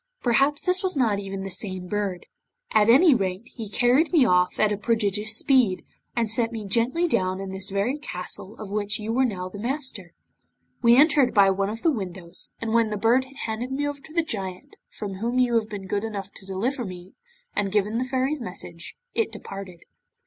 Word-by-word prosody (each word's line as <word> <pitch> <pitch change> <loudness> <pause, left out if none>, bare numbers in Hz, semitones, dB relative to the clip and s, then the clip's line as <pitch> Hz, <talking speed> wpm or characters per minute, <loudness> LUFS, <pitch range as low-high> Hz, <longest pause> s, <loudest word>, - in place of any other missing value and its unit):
Perhaps, 275 +4 +2
this 365 +1 +3
was 375 -5 0
not 220 -6 +2
even 195 -1 -5
the 195 - -5
same 185 -2 -1
bird. 200 -2 -2 0.5
At 215 0 +5
any 285 +6 +7
rate, 195 -1 -2
he 225 -4 -6
carried 250 +9 +3
me 315 -7 +5
off 180 -3 +2
at 215 -1 +4
a - - +1
prodigious 215 0 0
speed, 245 -10 +3 0.3
and 230 -1 +1
set 225 +2 +1
me 220 -3 -5
gently 240 - +1
down 185 - 0
in 195 -1 -5
this 190 +1 -4
very 205 +9 -1
castle 185 -4 -6
of 210 -2 -8
which 205 0 -1
you 220 +2 -3
are 265 - +5
now 185 -6 -3
the 200 +2 -9
master. 240 - -3 0.7
We 235 0 +6
entered 290 -3 +5
by 195 -1 +6
one 195 +1 0
of 225 +2 -6
the 330 - +4
windows, 185 - -6
and 225 -1 -2
when 230 -2 +3
the 210 - -2
Bird 235 +5 +3
had 275 +1 -16
handed 230 +3 -3
me 285 +2 -1
over 290 0 -4
to 310 - -15
the 335 +1 +1
Giant 190 - -5
from 200 -3 -6
whom 235 +3 -1
you 250 -1 +3
have 225 -2 +1
been 200 -2 -6
good 200 +2 -1
enough 200 -3 -5
to 195 - -13
deliver 240 +8 -1
me, 185 -2 -9 0.4
and 200 -1 0
given 210 +2 +1
the - - +1
Fairy's 260 +2 -1
message, 180 -5 -8 0.2
it 455 - 0
departed. 190 -3 -8
215 Hz, 205 wpm, -25 LUFS, 195-255 Hz, 0.7 s, any